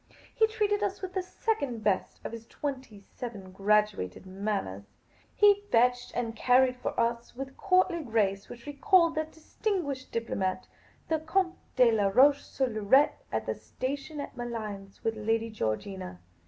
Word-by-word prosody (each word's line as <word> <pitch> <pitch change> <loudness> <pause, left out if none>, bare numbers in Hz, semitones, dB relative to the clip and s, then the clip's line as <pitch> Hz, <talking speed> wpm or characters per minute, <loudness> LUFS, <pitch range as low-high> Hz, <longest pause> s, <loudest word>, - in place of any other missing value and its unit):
He 440 - +4
treated 420 -2 0
us 400 -1 -2
with 370 - -4
the 375 - 0
second 285 - -2
best 200 -3 0
of - - -3
his 230 0 -9
twenty 260 -8 -5
seven 205 -6 -7
graduated 200 - +1
manners. 190 - -3 0.5
He 410 -1 +6
fetched 245 +1 +3
and 230 -2 -2
carried 250 +2 +4
for 250 - -3
us 235 0 -1
with 270 +1 -5
a - - -21
courtly 370 +1 +2
grace 210 -6 0
which 235 - -10
recalled 335 +3 +3
that 315 0 -2
distinguished 320 -5 -3
diplomat, 190 -5 -2 0.4
the 320 -1 +1
Comte 350 +3 0 0.2
de 250 -2 +6
Laroche 225 +7 +5
sur 265 - -1
Loiret, 235 +5 +4 0.2
at - - -1
the - - -1
station 280 +3 -5
at 285 - -6
Malines 215 -5 -6
with 225 0 0
Lady 225 +1 0
Georgina. 185 - -3
245 Hz, 155 wpm, -29 LUFS, 210-310 Hz, 0.5 s, He